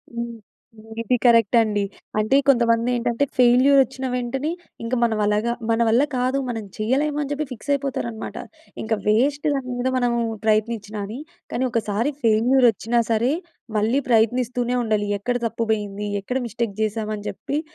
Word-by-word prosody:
హ్మ్. 235 0 -4 0.7
ఇది 230 +2 +1
కరెక్ట్ 230 -2 +5
అండి. 210 -2 0 0.4
అంటే, 215 +6 +3
కొంతమంది 235 -2 +3
ఏంటంటే 240 +3 0
ఫెయిల్యూర్ 255 +3 +5
వచ్చిన 265 +1 -7
వెంటనే 255 +5 -2 0.3
ఇంక 230 - -4
మనం 225 -2 +1
అలాగా 210 +3 +1 0.2
మన 225 0 +2
వల్ల 230 +4 +4
కాదు, 255 +2 +1
మనం 225 -2 -3
చేయలేమని 285 +6 0
చెప్పి 295 +1 -1
ఫిక్స్ 250 +3 -9
అయిపోతారన్నమాట. 265 -5 -3 0.5
ఇంక 220 - -1
వేస్ట్ 275 +8 +2
దాని 270 -2 -3
మీద 245 +1 -1
మనము 240 -1 +1 0.3
ప్రయత్నించినా 215 -1 0
అని. 225 +6 -7 0.3
కానీ, 255 - 0
ఒకసారి 225 +3 0
ఫెయిల్యూర్ 235 +4 +4
వచ్చినా 230 +4 0
సరే, 230 +4 +2 0.5
మళ్ళీ 225 +7 +2
ప్రయత్నిస్తూనే 245 +2 +2
ఉండాలి. 215 -2 0
ఎక్కడ 245 +4 -2
తప్పు 230 0 -2
పోయింది? 205 -1 -2
ఎక్కడ 250 +6 -2
మిస్టేక్ 230 -2 -3
చేశాం, 215 0 -1
అని 205 0 -9
చెప్పి? 290 +2 -3
235 Hz, 150 wpm, -22 LUFS, 220-255 Hz, 0.7 s, కరెక్ట్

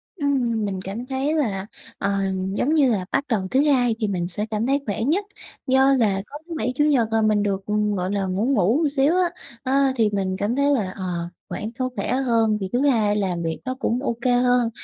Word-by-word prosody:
Ừm, 250 - 0
mình 190 -2 -3
cảm 205 +6 -6
thấy 270 +3 -1
là, 200 -10 -1 0.3
ờ, 200 0 -1 0.4
giống 280 +8 +1
như 285 -5 +4
là, 195 -5 -1
bắt 275 +1 +1
đầu 200 -6 0
thứ 265 - +4
Hai 245 -5 +3
thì 215 - 0
mình 180 -3 -2
sẽ 205 +4 0
cảm 215 +2 -1
thấy 275 +1 +2
khỏe 210 +1 -2
nhất, 350 - +1 0.4
do 265 +1 +4
là 195 -4 +2
có 290 - -8
thứ 340 - -6
Bảy, 250 - -1
Chủ 295 - +2
Nhật 275 -7 +3
là 225 0 +2
mình 215 -1 +2
được, 195 -1 -1 0.4
gọi 180 +1 -2
là, 200 -1 0
ngủ 190 +4 -1
ngủ 260 - +2
xíu 285 +4 +2
á, 365 -1 +2 0.3
ơ, 270 0 +2
thì 225 -4 +2
mình 190 -2 -1
cảm 210 +4 0
thấy 280 +1 +2
là, 205 -9 0
ờ, 175 -3 -4 0.2
khoảng 215 +2 -4
có 255 0 0
khỏe - - -2
hơn 230 -5 +2
thì 190 - -3
thứ 245 - +2
Hai 215 -5 +2
làm 180 -4 -1
việc 160 -1 -3
nó 255 - -2
cũng 245 -2 0
OK 235 -2 -3 0.2
hơn. 245 -2 +3
230 Hz, 225 wpm, -23 LUFS, 200-270 Hz, 0.4 s, như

